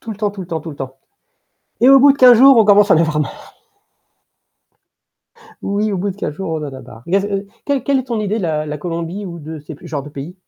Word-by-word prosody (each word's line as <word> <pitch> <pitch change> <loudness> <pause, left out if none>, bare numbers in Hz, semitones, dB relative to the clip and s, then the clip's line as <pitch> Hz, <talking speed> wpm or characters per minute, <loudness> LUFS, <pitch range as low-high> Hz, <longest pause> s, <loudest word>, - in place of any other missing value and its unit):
Tout 225 - -9
le 210 - -6
temps, 210 -1 -1
tout 200 -2 -10
le 180 - -7
temps, 165 -2 -4
tout 160 - -8
le 145 - -11
temps. 135 0 -8 0.8
Et 255 - +6
au 275 0 +8
bout 280 +1 +7
de 280 - -6
15 250 -3 +7
jours, 270 0 +7
on 220 - +5
commence 205 0 +5
à - - +7
en - - +3
avoir 160 -2 +1
marre. 150 - -6 2.1
Oui, 205 +1 -1
au - - -1
bout 195 +2 -2
de 185 - -9
15 150 -7 -4
jours, 190 +1 -5
on 160 - -2
en 140 - -7
a 130 - -9
marre. 115 +1 -14
Il 175 - -2
y - - +6
a 200 - +3
c 205 - -4
heu. 195 0 -3 0.2
Quelle 280 -2 -1
quelle 280 -1 +1
est 255 - -9
ton 235 -4 -3
idée 210 +2 -2
de - - -4
la 155 -2 -2
la 150 0 -5
Colombie 170 +4 -5
ou 170 -2 -8
de 155 0 -8
ces 150 +1 -10
pu - - -14
genres 145 -3 -4
de 150 - -10
pays? 145 +5 -8
190 Hz, 300 wpm, -17 LUFS, 155-215 Hz, 2.1 s, au